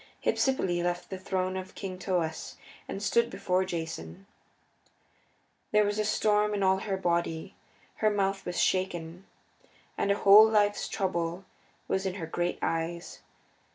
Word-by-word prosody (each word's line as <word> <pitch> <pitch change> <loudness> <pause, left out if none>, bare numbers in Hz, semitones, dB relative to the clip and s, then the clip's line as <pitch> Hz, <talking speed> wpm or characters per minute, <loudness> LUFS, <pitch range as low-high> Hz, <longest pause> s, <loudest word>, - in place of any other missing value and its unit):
Hypsipyle 185 -10 +1
left 175 +1 -2
the 190 - -4
throne 185 0 -2
of 185 0 -6
King 185 -2 -6
Thoas 170 -4 -2 0.3
and 195 - -5
stood 235 +2 +2
before 185 -3 0
Jason. 160 - -6 1.5
There 210 0 +5
was 205 +1 -1
a 215 - +1
storm 210 0 +2
in 200 - -1
all 190 0 +4
her 195 0 -2
body; 170 -3 -1 0.4
her 215 - +3
mouth 195 -1 0
was 175 - -3
shaken, 180 -1 -1 0.7
and 200 - +2
a - - +3
whole 210 +3 +8
life's 205 -1 +2
trouble 175 -1 -2 0.4
was 190 0 0
in 185 - -3
her 175 -5 -4
great 175 +2 -2
eyes. 165 +1 -3
190 Hz, 145 wpm, -29 LUFS, 175-200 Hz, 1.5 s, whole